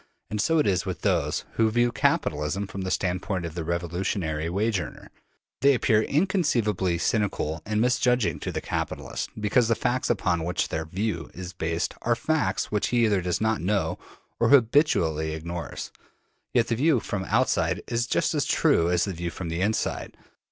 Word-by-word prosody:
And 105 Hz, -1 st, 0 dB
so 165 Hz, +9 st, +2 dB
it 150 Hz, -, +3 dB
is 95 Hz, -3 st, +2 dB
with 90 Hz, -3 st, -5 dB
those -, -, +1 dB
who 115 Hz, -1 st, +2 dB
view 120 Hz, +2 st, +2 dB
the -, -, -6 dB
capitalist 75 Hz, +4 st, +1 dB
from 100 Hz, -, -5 dB
the 95 Hz, -, -3 dB
standpoint 90 Hz, 0 st, -1 dB
of 80 Hz, -, -5 dB
the 85 Hz, -1 st, -4 dB
revolutionary 85 Hz, -1 st, -2 dB
wage 100 Hz, +3 st, 0 dB
earner: 75 Hz, -, -8 dB, 0.5 s
they 140 Hz, 0 st, +5 dB
appear 110 Hz, -3 st, +3 dB
inconceivably 120 Hz, -, +1 dB
cynical 85 Hz, -5 st, -1 dB
and 105 Hz, 0 st, 0 dB
misjudging 125 Hz, -, +2 dB
to -, -, -4 dB
the -, -, -3 dB
capitalist, -, -, -3 dB
because 110 Hz, +3 st, +2 dB
the 115 Hz, -, +2 dB
facts 125 Hz, +2 st, -1 dB
upon 90 Hz, -7 st, +1 dB
which 90 Hz, +2 st, -1 dB
their 80 Hz, 0 st, -2 dB
view 90 Hz, 0 st, -3 dB
is 90 Hz, 0 st, -7 dB
based 80 Hz, +1 st, -2 dB
are 120 Hz, 0 st, +2 dB
facts 155 Hz, +6 st, 0 dB
which 105 Hz, -1 st, +1 dB
he 120 Hz, -1 st, +3 dB
either 100 Hz, -4 st, +2 dB
does 90 Hz, -1 st, -1 dB
not 110 Hz, -2 st, +1 dB
know 100 Hz, +3 st, 0 dB, 0.4 s
or -, -, +3 dB
habitually 110 Hz, -, +3 dB
ignores. 85 Hz, +2 st, -6 dB, 0.6 s
Yet 120 Hz, -2 st, +2 dB
the 115 Hz, -, +1 dB
view 140 Hz, +2 st, +3 dB
from 105 Hz, -2 st, -3 dB
the 95 Hz, -, -7 dB
outside 90 Hz, -9 st, +1 dB
is 120 Hz, 0 st, -1 dB
just -, -, +1 dB
as -, -, +1 dB
true 85 Hz, +1 st, +3 dB
as 90 Hz, -1 st, +2 dB
the 100 Hz, -, -3 dB
view 85 Hz, 0 st, -4 dB
from 85 Hz, 0 st, -6 dB
the 85 Hz, +2 st, -2 dB
inside. 105 Hz, +3 st, -1 dB
100 Hz, 185 wpm, -26 LUFS, 85-115 Hz, 0.6 s, they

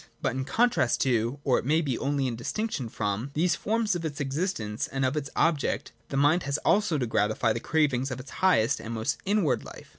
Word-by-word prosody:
But -, -, -1 dB
in 130 Hz, 0 st, -2 dB
contrast 235 Hz, -, +2 dB
to, 120 Hz, 0 st, +1 dB
or 130 Hz, -, +3 dB
it -, -, -6 dB
may 155 Hz, +4 st, +3 dB
be 140 Hz, -7 st, -1 dB
only 140 Hz, +1 st, -1 dB
in 125 Hz, -3 st, -1 dB
distinction 135 Hz, -, -3 dB
from, 105 Hz, +4 st, -2 dB
these 175 Hz, +3 st, +2 dB
forms 220 Hz, -2 st, 0 dB
of 170 Hz, -, -3 dB
its 155 Hz, -2 st, -4 dB
existence 135 Hz, -, -2 dB
and 135 Hz, 0 st, -1 dB
of 130 Hz, +3 st, 0 dB
its 145 Hz, -1 st, -3 dB
objects, 155 Hz, -4 st, +1 dB, 0.2 s
the 135 Hz, -, -2 dB
mind 145 Hz, +5 st, +4 dB
has 140 Hz, -1 st, -1 dB
also 200 Hz, -6 st, +3 dB
to 130 Hz, -, 0 dB
gratify 110 Hz, 0 st, +1 dB
the 115 Hz, -, -3 dB
cravings 140 Hz, -3 st, +1 dB
of 130 Hz, -, -5 dB
its 130 Hz, -, -10 dB
highest 140 Hz, -10 st, +3 dB
and 115 Hz, +1 st, -5 dB
most 110 Hz, 0 st, -1 dB
inward 200 Hz, -8 st, +2 dB
life. -, -, -11 dB
140 Hz, 215 wpm, -27 LUFS, 120-165 Hz, 0.2 s, mind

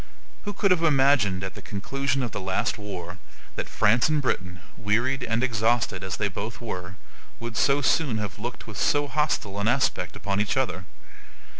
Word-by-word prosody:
Who 205 Hz, -, -3 dB
could 200 Hz, 0 st, +2 dB
have 180 Hz, -2 st, +4 dB
imagined 135 Hz, -, +3 dB
at 95 Hz, -, -4 dB
the -, -, -10 dB
conclusion 135 Hz, +6 st, -2 dB
of 120 Hz, -, -2 dB
the 100 Hz, -, -4 dB
last 95 Hz, +4 st, -1 dB
war 90 Hz, -3 st, -6 dB, 0.4 s
that -, -, -4 dB
France 120 Hz, +7 st, +3 dB
and 155 Hz, -1 st, +2 dB
Britain, 90 Hz, -10 st, -2 dB
wearied 120 Hz, +5 st, +1 dB
and 115 Hz, +1 st, 0 dB
exhausted 115 Hz, -5 st, +1 dB
as 95 Hz, -2 st, -3 dB
they 105 Hz, -, +1 dB
both 105 Hz, +4 st, -5 dB
were, 90 Hz, -5 st, -5 dB, 0.4 s
would 115 Hz, 0 st, -5 dB
so 140 Hz, +5 st, +3 dB
soon 135 Hz, -4 st, +2 dB
have 105 Hz, -2 st, -4 dB
looked 120 Hz, +2 st, -5 dB
with 105 Hz, -2 st, -7 dB
so 145 Hz, 0 st, +2 dB
hostile 140 Hz, -9 st, 0 dB
an 100 Hz, -, 0 dB
aspect 120 Hz, -7 st, +1 dB
upon 100 Hz, 0 st, -1 dB
each 105 Hz, +4 st, 0 dB
other? 105 Hz, -9 st, -1 dB
115 Hz, 180 wpm, -26 LUFS, 100-135 Hz, 0.4 s, have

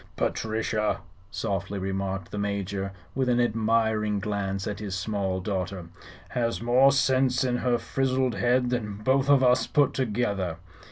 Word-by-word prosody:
"Patrichia," 110 Hz, -1 st, -1 dB, 0.3 s
softly 100 Hz, 0 st, -3 dB
remarked 95 Hz, -1 st, -3 dB
the 105 Hz, -, -4 dB
Major, 100 Hz, -1 st, -2 dB, 0.2 s
with 130 Hz, -1 st, 0 dB
an 120 Hz, 0 st, +3 dB
admiring 110 Hz, -2 st, +1 dB
glance 100 Hz, -1 st, -2 dB
at 105 Hz, -2 st, -4 dB
his 100 Hz, -3 st, -4 dB
small 95 Hz, -1 st, -1 dB
daughter, 95 Hz, -2 st, -3 dB, 0.4 s
"has 115 Hz, -1 st, -1 dB
more 125 Hz, +4 st, +5 dB
sinse 130 Hz, -2 st, +2 dB
in 125 Hz, -1 st, +1 dB
her 125 Hz, -1 st, +1 dB
frizzled 130 Hz, -1 st, 0 dB
head 120 Hz, +5 st, +2 dB
than 110 Hz, -5 st, -2 dB
both 135 Hz, +3 st, +2 dB
of 140 Hz, -2 st, +6 dB
us 125 Hz, 0 st, +4 dB
put 145 Hz, -3 st, +2 dB
together." 100 Hz, -8 st, -1 dB
110 Hz, 145 wpm, -27 LUFS, 100-125 Hz, 0.4 s, of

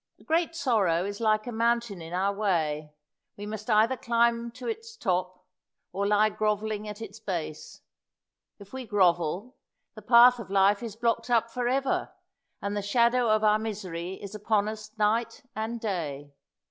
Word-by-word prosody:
A -, -, -19 dB
great 330 Hz, +1 st, 0 dB
sorrow 205 Hz, -, +1 dB
is 200 Hz, 0 st, -5 dB
like 215 Hz, -1 st, +2 dB
a 245 Hz, -, -4 dB
mountain 235 Hz, -4 st, 0 dB
in 165 Hz, 0 st, -9 dB
our 190 Hz, +3 st, 0 dB
way: 160 Hz, -7 st, -1 dB, 0.5 s
we 205 Hz, -, -6 dB
must 215 Hz, +1 st, -6 dB
either 220 Hz, +4 st, +4 dB
climb 235 Hz, -1 st, +1 dB
to 250 Hz, 0 st, -8 dB
its 450 Hz, -, -5 dB
top, 185 Hz, -, -2 dB, 0.5 s
or 200 Hz, +1 st, -1 dB
lie 210 Hz, +1 st, +4 dB
grovelling 215 Hz, 0 st, -1 dB
at 210 Hz, +2 st, -7 dB
its 210 Hz, 0 st, -10 dB
base. 170 Hz, -7 st, -5 dB, 0.8 s
If 200 Hz, +1 st, -15 dB
we 260 Hz, -2 st, -6 dB
grovel, 185 Hz, -, +1 dB, 0.4 s
the -, -, -11 dB
path 245 Hz, +1 st, +7 dB
of 215 Hz, -, -8 dB
life 200 Hz, +1 st, +3 dB
is 225 Hz, -4 st, -6 dB
blocked 230 Hz, +2 st, 0 dB
up 230 Hz, -1 st, +2 dB
for 245 Hz, 0 st, -2 dB
ever, 270 Hz, +2 st, 0 dB, 0.5 s
and 200 Hz, +1 st, -2 dB
the 205 Hz, -, -1 dB
shadow 235 Hz, +3 st, +2 dB
of 215 Hz, 0 st, +3 dB
our 215 Hz, 0 st, +4 dB
misery 190 Hz, -5 st, -5 dB
is 200 Hz, +1 st, -9 dB
upon 210 Hz, 0 st, +1 dB
us 215 Hz, 0 st, -6 dB
night 225 Hz, +6 st, 0 dB
and 220 Hz, +2 st, -3 dB
day. 150 Hz, -9 st, -4 dB
215 Hz, 170 wpm, -27 LUFS, 195-235 Hz, 0.8 s, path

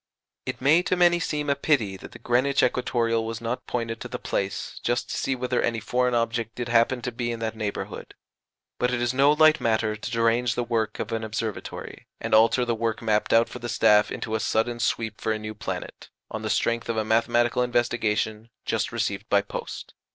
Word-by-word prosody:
It -, -, -4 dB
may 150 Hz, +6 st, +5 dB
to 185 Hz, -, 0 dB
many 175 Hz, -1 st, +4 dB
seem 150 Hz, -3 st, -2 dB
a 140 Hz, -, +2 dB
pity 135 Hz, -9 st, +1 dB
that -, -, -11 dB
the -, -, -11 dB
Greenwich 130 Hz, +3 st, +2 dB
Equatoreal 115 Hz, -2 st, +1 dB
was 115 Hz, 0 st, -4 dB
not 115 Hz, +2 st, -4 dB
pointed 115 Hz, -2 st, -3 dB
to -, -, -5 dB
the 125 Hz, +1 st, -5 dB
place, 100 Hz, -4 st, -3 dB
just 120 Hz, 0 st, -1 dB
to -, -, -2 dB
see 135 Hz, -, -1 dB
whether 125 Hz, 0 st, -1 dB
any 115 Hz, -1 st, 0 dB
foreign 125 Hz, +3 st, 0 dB
object 115 Hz, -1 st, -1 dB
did 120 Hz, -1 st, -4 dB
happen 120 Hz, +1 st, +3 dB
to 125 Hz, -, -2 dB
be 120 Hz, 0 st, -3 dB
in 115 Hz, -, -3 dB
that 110 Hz, -1 st, -2 dB
neighbourhood; 105 Hz, -2 st, -5 dB, 0.6 s
but 125 Hz, 0 st, +1 dB
it 125 Hz, -, 0 dB
is 120 Hz, +1 st, 0 dB
no 140 Hz, +2 st, +5 dB
light 155 Hz, +1 st, +5 dB
matter 110 Hz, -1 st, +1 dB
to 105 Hz, -, -6 dB
derange 115 Hz, 0 st, +2 dB
the 120 Hz, -, 0 dB
work 115 Hz, -2 st, -1 dB
of -, -, -4 dB
an 115 Hz, 0 st, -2 dB
Observatory, 110 Hz, -1 st, -5 dB
and -, -, -3 dB
alter 115 Hz, +3 st, +5 dB
the 120 Hz, -, 0 dB
work 115 Hz, -1 st, -1 dB
mapped 105 Hz, -1 st, +1 dB
out 115 Hz, +1 st, +5 dB
for -, -, -8 dB
the 120 Hz, -, -5 dB
staff 105 Hz, -2 st, +4 dB
into 110 Hz, -, -4 dB
a 110 Hz, -, +1 dB
sudden 120 Hz, +2 st, 0 dB
sweep 110 Hz, -2 st, -1 dB
for 110 Hz, -, 0 dB
a -, -, -2 dB
new 110 Hz, 0 st, -6 dB
planet, 105 Hz, -, -6 dB, 0.2 s
on -, -, -4 dB
the -, -, -3 dB
strength 115 Hz, 0 st, 0 dB
of 115 Hz, -, -1 dB
a 110 Hz, -, 0 dB
mathematical 120 Hz, +2 st, +2 dB
investigation 115 Hz, -2 st, 0 dB, 0.2 s
just -, -, -1 dB
received -, -, -2 dB
by -, -, +4 dB
post. -, -, -7 dB
115 Hz, 215 wpm, -25 LUFS, 110-125 Hz, 0.6 s, may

